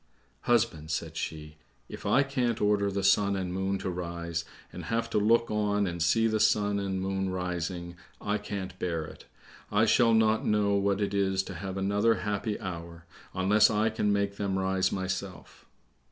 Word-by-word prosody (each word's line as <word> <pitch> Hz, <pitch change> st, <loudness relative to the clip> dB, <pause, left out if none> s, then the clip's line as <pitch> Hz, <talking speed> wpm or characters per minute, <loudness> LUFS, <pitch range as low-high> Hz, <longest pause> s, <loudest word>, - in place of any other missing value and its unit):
"Husband," 110 Hz, -10 st, +1 dB
said 80 Hz, -, -3 dB
she, 75 Hz, -1 st, -5 dB, 0.3 s
"if -, -, -7 dB
I 135 Hz, -, +4 dB
can't 125 Hz, -4 st, -1 dB
order 105 Hz, -1 st, +2 dB
the 100 Hz, 0 st, -2 dB
sun 100 Hz, +1 st, +3 dB
and 95 Hz, -2 st, -3 dB
moon 95 Hz, +1 st, -1 dB
to 95 Hz, -, -4 dB
rise, 85 Hz, -1 st, -4 dB, 0.3 s
and -, -, -7 dB
have 115 Hz, 0 st, -1 dB
to 105 Hz, -, +2 dB
look 115 Hz, +2 st, +3 dB
on 105 Hz, -1 st, +1 dB
and 85 Hz, -2 st, -4 dB
see 115 Hz, +7 st, +3 dB
the 110 Hz, -1 st, +1 dB
sun 105 Hz, -1 st, +2 dB
and 95 Hz, -1 st, -2 dB
moon 95 Hz, 0 st, -1 dB
rising, 90 Hz, -1 st, -4 dB, 0.2 s
I 105 Hz, +1 st, -1 dB
can't 95 Hz, -3 st, -6 dB
bear 85 Hz, -3 st, -2 dB
it. -, -, -12 dB, 0.5 s
I 105 Hz, +2 st, +4 dB
shall 115 Hz, 0 st, +4 dB
not 110 Hz, 0 st, +3 dB
know 105 Hz, -1 st, +2 dB
what 100 Hz, 0 st, +1 dB
it 100 Hz, 0 st, -1 dB
is 95 Hz, -1 st, +1 dB
to 95 Hz, -, -8 dB
have 95 Hz, +2 st, -5 dB
another 100 Hz, +4 st, +2 dB
happy 105 Hz, 0 st, -2 dB
hour, 85 Hz, -3 st, -7 dB, 0.3 s
unless 100 Hz, +3 st, +4 dB
I 110 Hz, 0 st, +1 dB
can 105 Hz, -1 st, 0 dB
make 100 Hz, 0 st, 0 dB
them 100 Hz, -2 st, -1 dB
rise 95 Hz, 0 st, +1 dB
myself." 95 Hz, -1 st, -5 dB
100 Hz, 180 wpm, -29 LUFS, 95-105 Hz, 0.5 s, I